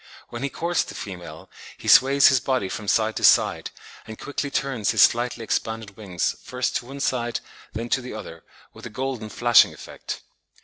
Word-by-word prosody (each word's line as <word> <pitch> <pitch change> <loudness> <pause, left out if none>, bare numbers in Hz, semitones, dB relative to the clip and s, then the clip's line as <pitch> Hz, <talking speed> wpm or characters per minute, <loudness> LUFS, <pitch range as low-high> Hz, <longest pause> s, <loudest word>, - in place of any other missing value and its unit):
When 120 - -7
he 140 - -1
courts 170 +4 -1
the - - -10
female, 90 -4 -8 0.3
he - - -10
sways 140 +1 +7
his 135 - +3
body 125 -7 -1
from 105 +1 -6
side 110 +1 +1
to - - -4
side, - - +4 0.4
and 110 -1 -8
quickly 145 0 -4
turns 135 -6 -1
his - - +5
slightly 120 0 +1
expanded 110 -2 -3
wings 95 -5 -2
first 125 0 -3
to 120 - -9
one 140 +1 -8
side, 120 -3 -1 0.3
then 115 +2 -4
to 130 - +1
the 125 -2 -8
other, 85 -6 -9 0.3
with - - -10
a - - -9
golden 125 -2 -4
flashing 120 +1 +4
effect. - - -8
120 Hz, 185 wpm, -24 LUFS, 110-130 Hz, 0.4 s, sways